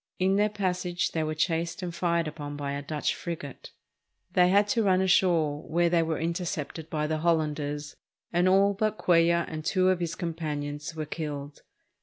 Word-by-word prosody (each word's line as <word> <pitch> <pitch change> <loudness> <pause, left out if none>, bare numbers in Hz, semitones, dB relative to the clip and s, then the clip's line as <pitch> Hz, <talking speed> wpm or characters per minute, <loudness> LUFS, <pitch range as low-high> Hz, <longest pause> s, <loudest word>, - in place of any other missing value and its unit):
In 190 +1 +2
their 210 +1 +3
passage 180 -3 -1
they 160 - -1
were 155 0 -2
chased 170 +3 -1
and 175 -1 -4
fired 170 -1 0
upon 145 -1 -6
by 140 -1 -3
a 140 0 -3
Dutch 150 +1 -1
frigate. 155 -6 -7 0.6
They 180 -1 +5
had 200 +2 +4
to 230 - +2
run 190 -3 +3
ashore, 170 -5 +3
where 170 +2 +1
they 170 -1 +4
were 160 -1 -1
intercepted 165 -2 -3
by 150 -1 -1
the 155 0 -1
Hollanders, 150 -3 -1 0.4
and 175 +2 +3
all 195 +2 +4
but 215 +1 -1
Cuellar 170 -1 +3
and 155 -1 -5
two 185 +3 +2
of 185 -1 +2
his 170 0 -2
companions 150 -3 -4
were 155 -1 -3
killed. 145 -2 -6
165 Hz, 180 wpm, -28 LUFS, 150-180 Hz, 0.6 s, They